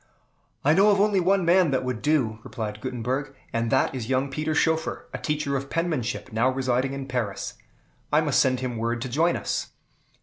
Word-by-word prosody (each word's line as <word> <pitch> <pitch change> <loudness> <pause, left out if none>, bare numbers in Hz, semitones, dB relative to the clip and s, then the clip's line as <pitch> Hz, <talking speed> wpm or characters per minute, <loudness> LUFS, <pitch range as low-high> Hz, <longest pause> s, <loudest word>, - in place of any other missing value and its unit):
"I 150 - +6
know 195 +5 +5
of 200 -1 +4
only 205 -1 +3
one 190 +1 +2
man 175 0 +5
that 130 -2 0
would 125 -3 -3
do," 130 -8 +1
replied 105 -3 -5
Gutenberg, 130 +3 -3 0.2
"and 115 0 0
that 130 - +2
is 125 -3 -5
young 135 +1 +1
Peter 155 +2 -1
Schoeffer, 160 +1 0
a - - -4
teacher 150 -2 -1
of 135 0 -3
penmanship, 150 -11 -2
now 115 +4 +3
residing 130 0 0
in 135 -1 -5
Paris. 115 -7 -3 0.6
I - - +5
must - - +2
send 130 -1 +2
him 125 -2 -3
word 115 +1 -1
to 130 - -4
join 160 +7 +2
us." - - -2
135 Hz, 195 wpm, -25 LUFS, 120-155 Hz, 0.6 s, I